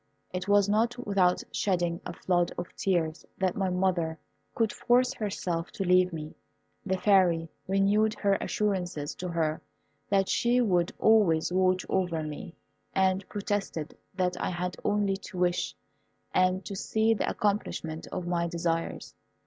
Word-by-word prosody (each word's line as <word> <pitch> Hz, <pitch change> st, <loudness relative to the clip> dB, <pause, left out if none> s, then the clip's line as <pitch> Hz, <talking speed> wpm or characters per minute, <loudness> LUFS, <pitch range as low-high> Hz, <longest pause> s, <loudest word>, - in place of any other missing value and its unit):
It 180 Hz, +1 st, -3 dB
was 205 Hz, -1 st, +4 dB
not 225 Hz, +4 st, +1 dB
without 185 Hz, -3 st, +2 dB
shedding 175 Hz, -3 st, 0 dB
a -, -, -5 dB
flood 175 Hz, -2 st, +1 dB
of 175 Hz, -, -6 dB
tears 170 Hz, -4 st, 0 dB
that 185 Hz, -1 st, 0 dB
my 195 Hz, -1 st, 0 dB
mother 180 Hz, -3 st, 0 dB, 0.4 s
could 225 Hz, -2 st, +1 dB
force 250 Hz, +1 st, +2 dB
herself 180 Hz, -7 st, -3 dB
to 195 Hz, -, -2 dB
leave 180 Hz, 0 st, +4 dB
me. 155 Hz, -2 st, -6 dB, 0.5 s
The 190 Hz, -3 st, 0 dB
Fairy 180 Hz, -4 st, +3 dB, 0.2 s
renewed 200 Hz, +3 st, +3 dB
her 200 Hz, -1 st, +2 dB
assurances 180 Hz, -8 st, -1 dB
to 180 Hz, -, -6 dB
her 160 Hz, -2 st, -1 dB, 0.5 s
that 195 Hz, -1 st, +3 dB
she 240 Hz, +1 st, +2 dB
would 180 Hz, -7 st, +2 dB
always 180 Hz, -7 st, +4 dB
watch 185 Hz, 0 st, +2 dB
over 175 Hz, -4 st, 0 dB
me, 155 Hz, +3 st, -7 dB, 0.4 s
and 190 Hz, 0 st, +1 dB
protested 200 Hz, -6 st, -3 dB, 0.2 s
that 180 Hz, -1 st, 0 dB
I -, -, 0 dB
had 180 Hz, 0 st, -3 dB
only 205 Hz, -2 st, +1 dB
to 195 Hz, -1 st, -10 dB
wish, 180 Hz, 0 st, 0 dB, 0.6 s
and 185 Hz, +1 st, +2 dB
to 200 Hz, -, -5 dB
see 220 Hz, +3 st, +2 dB
the 220 Hz, -, -1 dB
accomplishment 180 Hz, -6 st, -2 dB
of 180 Hz, -, -4 dB
my 170 Hz, -1 st, 0 dB
desires. 165 Hz, -1 st, -2 dB
185 Hz, 150 wpm, -28 LUFS, 175-200 Hz, 0.6 s, was